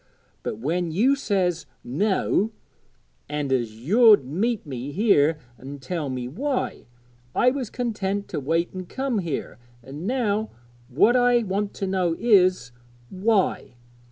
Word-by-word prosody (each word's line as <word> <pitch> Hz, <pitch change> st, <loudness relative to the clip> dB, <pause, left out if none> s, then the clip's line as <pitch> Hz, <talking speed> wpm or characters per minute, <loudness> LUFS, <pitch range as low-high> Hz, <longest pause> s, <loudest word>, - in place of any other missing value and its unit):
But -, -, -4 dB
when 165 Hz, +8 st, -1 dB
you 240 Hz, -, +3 dB
says, 180 Hz, -, -1 dB, 0.2 s
"no," 195 Hz, -, 0 dB, 0.8 s
and 145 Hz, -2 st, -1 dB
as 120 Hz, -4 st, -1 dB
you'd 205 Hz, -, +5 dB
meet 200 Hz, -, -1 dB
me 135 Hz, -1 st, -6 dB
here 165 Hz, -5 st, +3 dB, 0.2 s
an' 140 Hz, +2 st, -8 dB
tell 150 Hz, +2 st, -4 dB
me 125 Hz, -1 st, -4 dB
why, 260 Hz, -, -3 dB, 0.5 s
I 250 Hz, -, +4 dB
was 260 Hz, -4 st, -4 dB
content 205 Hz, -5 st, -2 dB
to -, -, -3 dB
wait 165 Hz, +5 st, 0 dB
an' 185 Hz, -1 st, -7 dB
come 260 Hz, -1 st, -2 dB
here; 165 Hz, -8 st, -4 dB, 0.2 s
an' 145 Hz, +8 st, -7 dB
now 220 Hz, -4 st, 0 dB, 0.4 s
what 185 Hz, -, +4 dB
I 245 Hz, -1 st, +4 dB
want 200 Hz, 0 st, -2 dB
to 195 Hz, -, -3 dB
know 185 Hz, -3 st, 0 dB
is 185 Hz, -, +3 dB, 0.4 s
why? 190 Hz, -, 0 dB
185 Hz, 135 wpm, -24 LUFS, 145-220 Hz, 0.8 s, you'd